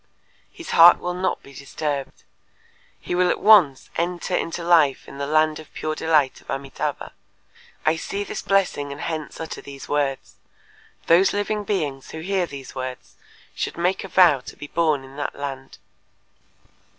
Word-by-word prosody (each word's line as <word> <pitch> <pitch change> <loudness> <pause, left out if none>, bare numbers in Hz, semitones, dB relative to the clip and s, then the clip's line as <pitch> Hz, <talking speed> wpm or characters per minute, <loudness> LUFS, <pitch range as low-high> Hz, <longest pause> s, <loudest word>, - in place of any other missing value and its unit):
His 340 - -9
heart 170 +1 +8
will 180 0 -4
not 185 +1 -2
be 140 - -14
disturbed. 140 0 -5 0.8
He - - -5
will 180 0 +3
at - - 0
once 185 -11 +5
enter 175 +1 -1
into 170 0 -2
life 160 -6 +3
in 140 - -10
the 140 - -2
land 155 0 +2
of 155 - -13
Pure 155 - -2
Delight 155 -4 +1
of - - -25
Amitâbha. 135 0 -4 0.7
I 155 +1 +3
see 200 +4 -4
this - - -5
blessing 190 -8 0
and 140 - -7
hence 160 -2 -5
utter 160 - -6
these 140 -1 -10
words. 140 -2 -2 0.7
Those 175 +4 +4
living 205 +1 -2
beings 150 -10 -2
who 160 - -7
hear 185 0 0
these 140 -3 -9
words 130 -1 -7 0.4
should - - -4
make 180 +2 0
a - - -6
vow 180 -6 +5
to 125 - -11
be - - -9
born 155 -2 0
in 135 +1 -13
that 145 - -3
land." 135 -2 -7
155 Hz, 165 wpm, -23 LUFS, 140-180 Hz, 0.8 s, heart